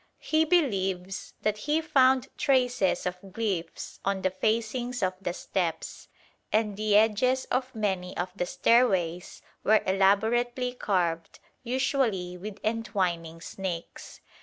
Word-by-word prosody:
He 315 0 +1
believes 195 - 0
that 215 0 0
he 300 +7 +1
found 265 -4 +3
traces 250 -7 +1
of 180 0 -3
glyphs 195 -4 -4
on 195 -1 -1
the 185 - +2
facings 230 +4 -1
of 185 0 +1
the 175 - -2
steps; 175 -1 -3 0.4
and 215 -1 +1
the 210 0 +1
edges 225 +5 +3
of 255 0 -1
many 190 -4 -2
of 180 +1 -2
the 180 -3 -2
stairways 190 -9 +1 0.2
were 215 +1 +4
elaborately 225 +6 +2
carved, 175 -8 -1 0.2
usually 235 -8 0
with 200 +3 -7
entwining 185 -7 -2
snakes. 180 -3 -6
210 Hz, 120 wpm, -28 LUFS, 185-245 Hz, 0.4 s, were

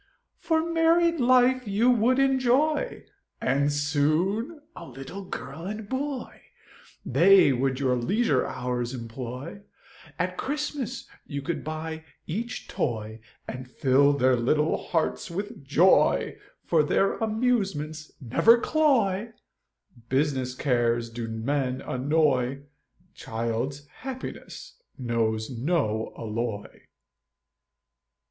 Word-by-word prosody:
For 320 -1 +1
married 335 0 +3
life 255 0 +4
you 215 +5 +3
would 245 +2 +3
enjoy, 270 +3 +2 0.3
And 140 +3 +1
soon 160 - 0
a - - -9
little 135 +10 -8
girl 160 -1 -7
and 210 +1 -5
boy, 265 +1 -4 0.6
They 170 +2 +6
would 130 +1 0
your 130 -2 +2
leisure 145 - +1
hours 125 0 -3
employ, 125 - -7 0.6
At - - -2
Christmas 290 -3 -3 0.2
you 140 -3 -5
could 170 +3 -3
buy 160 +1 -5 0.2
each 225 +8 -4
toy, 110 -4 -3 0.3
And 125 0 -7
fill 140 +2 +3
their 130 -2 +3
little 150 +6 +1
hearts 165 -2 -1
with 190 -3 -5
joy, 155 +7 +3 0.3
For 165 -2 +3
their 195 +6 +2
amusements 195 -10 -1
never 150 - +5
cloy, 235 -8 +1 0.8
Business 130 -2 0
cares 120 -3 0
do 115 0 -5
men 125 +3 -1
annoy, 135 -1 0 0.5
Child's 115 +5 -3
happiness 265 - -8 0.2
knows 115 -2 -1
no 120 -4 -1
alloy. 110 -1 -5
150 Hz, 100 wpm, -26 LUFS, -, 0.8 s, They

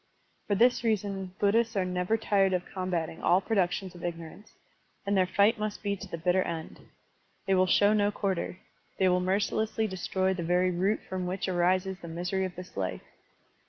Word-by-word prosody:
For 205 - +1
this 245 +4 +4
reason 195 -4 -1
Buddhists 225 +3 +2
are 190 -2 +1
never 180 +4 0
tired 195 -3 +2
of 180 -1 -1
com 185 -1 -5
bating 165 -2 -2
all 180 - +4
productions 190 -2 -1
of 175 - -12
ignorance, 170 +4 -7 0.5
and 200 0 +1
their 185 -1 +3
fight 205 +4 +3
must 210 0 -4
be 200 -1 0
to 200 +1 -9
the 170 - -5
bitter 180 +3 +2
end. 165 -3 -5 0.7
They 195 - +2
will 185 0 +4
show 205 +3 +4
no 205 -1 +3
quarter. 190 -3 -2 0.4
They 190 - +3
will 180 0 +3
mercilessly 210 +4 0
destroy 190 -1 -1
the 185 - -4
very 180 +2 +2
root 190 +5 0
from 185 -1 -3
wWch 185 +1 -2
arises 185 +2 +1
the 170 - -9
misery 180 +3 -2
of 185 - -6
this 180 0 -10
life. 95 -2 -3
190 Hz, 190 wpm, -29 LUFS, 180-205 Hz, 0.7 s, this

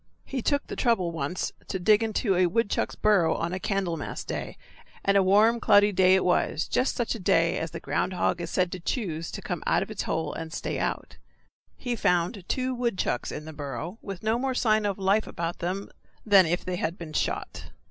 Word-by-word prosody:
He 265 -2 -3
took 285 +4 0
the - - -6
trouble 225 -9 +1
once 165 +2 -3 0.2
to - - -2
dig 210 +4 +4
into 220 -2 0
a 180 0 +4
woodchuck's 215 +4 0
burrow 200 -6 +3
on 170 +2 -2
a 185 - -2
Candlemas 185 -6 -2
day - - -5 0.5
and 200 - +3
a 200 - +6
warm, 210 +5 +4
cloudy 205 -1 +5
day 185 -1 +5
it 190 - +1
was; 175 -3 +1
just 255 - +1
such 240 - -1
a 230 - -6
day 170 -1 +2
as 165 - -3
the - - -7
ground 185 - -1
hog 175 -1 0
is 170 - -4
said 180 0 0
to 185 - -5
choose 170 - -3
to - - -7
come - - -3
out - - +3
of - - -10
his - - -4
hole 160 - -2
and 165 0 -6
stay - - -3
out. - - -3 0.6
He 245 -2 -2
found 180 -1 0
two 255 0 0
woodchucks 235 - -1
in 150 - -6
the 160 - -8
burrow, 145 - -6
with 195 -1 -7
no 220 +2 +1
more 260 0 -1
sign 215 -3 +2
of 200 - -2
life 200 +2 +2
about 170 0 -4
them 185 +3 -3 0.3
than 195 -5 +6
if 175 +2 -1
they 185 -1 -2
had 170 +1 -2
been 160 -2 -8
shot. - - -2
190 Hz, 215 wpm, -27 LUFS, 170-215 Hz, 0.6 s, a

